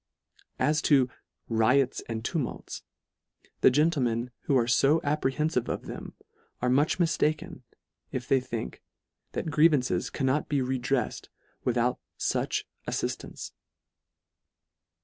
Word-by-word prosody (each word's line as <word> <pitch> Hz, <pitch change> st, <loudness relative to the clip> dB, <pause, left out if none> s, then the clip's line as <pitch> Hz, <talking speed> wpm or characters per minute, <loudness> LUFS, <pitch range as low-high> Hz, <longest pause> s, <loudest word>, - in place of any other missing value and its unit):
As 150 Hz, 0 st, +2 dB
to 130 Hz, -4 st, +5 dB, 0.4 s
"riots 120 Hz, +4 st, +3 dB
and 110 Hz, 0 st, -3 dB
tumults," 155 Hz, -9 st, -3 dB, 0.8 s
the -, -, +7 dB
gentle 150 Hz, +3 st, +2 dB
men 120 Hz, 0 st, 0 dB
who 140 Hz, -, +3 dB
are 120 Hz, -2 st, +2 dB
fo 140 Hz, +6 st, +4 dB
apprehenfive 150 Hz, -2 st, 0 dB
of -, -, -3 dB
them, -, -, -7 dB, 0.4 s
are 125 Hz, 0 st, +1 dB
much 145 Hz, +4 st, +3 dB
miftaken, 155 Hz, -3 st, 0 dB, 0.5 s
if 125 Hz, -1 st, -4 dB
they 135 Hz, -, +4 dB
think, 120 Hz, -, -5 dB, 0.5 s
that 160 Hz, -, -2 dB
grievan 150 Hz, -3 st, +5 dB
ces 90 Hz, -8 st, -1 dB
cannot 135 Hz, +1 st, 0 dB
be 145 Hz, -, +1 dB
redrefled 130 Hz, 0 st, -1 dB, 0.4 s
without 125 Hz, 0 st, +1 dB, 0.2 s
fuch -, -, 0 dB, 0.2 s
aftift -, -, -2 dB
ance. -, -, -8 dB
130 Hz, 120 wpm, -28 LUFS, 125-150 Hz, 0.8 s, the